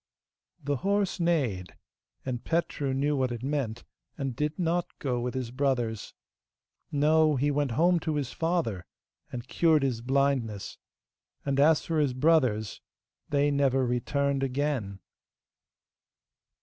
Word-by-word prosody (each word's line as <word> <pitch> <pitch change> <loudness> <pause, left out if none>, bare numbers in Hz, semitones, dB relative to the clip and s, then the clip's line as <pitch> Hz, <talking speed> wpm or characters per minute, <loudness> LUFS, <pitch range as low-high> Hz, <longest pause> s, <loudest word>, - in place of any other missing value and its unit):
The 145 0 0
horse 200 +6 0
neighed, 115 - 0 0.5
and 125 -2 -3
Petru 165 -4 -1
knew 140 +3 +1
what 130 -2 0
it 120 0 -5
meant, 135 -5 -2 0.3
and 135 -4 -3
did 150 +3 -2
not 175 0 0
go 125 -3 -1
with 125 +2 -3
his 125 -3 -3
brothers. 125 -5 -1 0.8
No, 155 +1 +3
he 145 +3 +1
went 145 -3 0
home 175 +6 +3
to 160 -2 -2
his 140 -4 -2
father, 160 - -1 0.4
and 120 0 -6
cured 160 0 +3
his 125 -4 -1
blindness; 130 -5 0 0.7
and 140 -1 0
as 150 +2 +4
for 160 -2 0
his 140 -4 +1
brothers, 130 - +2 0.5
they 145 0 +2
never 135 -2 +2
returned 140 +3 0
again. 130 -7 -1
140 Hz, 130 wpm, -28 LUFS, 125-150 Hz, 0.8 s, as